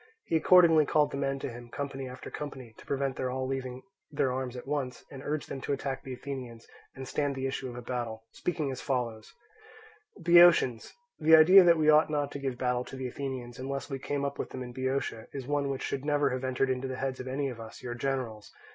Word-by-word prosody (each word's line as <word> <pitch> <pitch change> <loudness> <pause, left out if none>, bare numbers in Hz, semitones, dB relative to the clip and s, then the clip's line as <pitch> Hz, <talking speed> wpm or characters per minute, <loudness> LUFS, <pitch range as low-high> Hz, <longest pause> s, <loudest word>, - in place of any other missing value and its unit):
He - - -1
accordingly 165 -2 +6
called 150 -1 +3
the - - -4
men 135 -1 -1
to - - -3
him, 120 0 -10
company 135 -1 -5
after 125 - -9
company, 130 -6 -7
to - - -14
prevent 135 -1 -1
their 130 - -1
all 130 +1 -2
leaving 130 -1 -4 0.3
their 140 -3 0
arms 130 -1 -3
at 125 - -7
once, 135 -3 -3
and 135 -2 -8
urged 150 0 -2
them 135 - -6
to 140 - -1
attack 135 -1 -3
the 130 - -7
Athenians, 125 -3 -7 0.3
and 130 -1 -7
stand 145 0 -1
the 135 0 -3
issue 135 -1 -3
of 120 - -8
a 125 - -7
battle, 115 -2 -4
speaking 155 -6 -2
as 130 - -6
follows: 120 -5 -2 0.9
"Boeotians, 170 - +5 0.3
the 160 +1 +7
idea 180 +5 +9
that 170 -1 +6
we 155 -1 +5
ought 155 +1 +5
not 145 -2 -1
to 140 - -5
give 135 -3 -3
battle 125 -1 0
to - - -9
the 130 -1 -4
Athenians, 125 -2 -6
unless 135 +2 -4
we 135 - -3
came 140 +1 -2
up 140 0 -4
with - - -3
them 130 - -6
in 125 -1 -8
Boeotia, 130 -3 -2
is 135 -3 -5
one 145 0 0
which 135 -1 -3
should 135 -1 -3
never 145 -2 +2
have 130 +1 -3
entered 130 +1 +1
into 130 +1 -2
the 130 0 -5
head 135 -1 -3
of 130 - -6
any 140 +2 -1
of 120 -3 -8
us, 110 +2 -10
your 120 -1 -4
generals. 120 -4 -3
135 Hz, 235 wpm, -29 LUFS, 125-145 Hz, 0.9 s, idea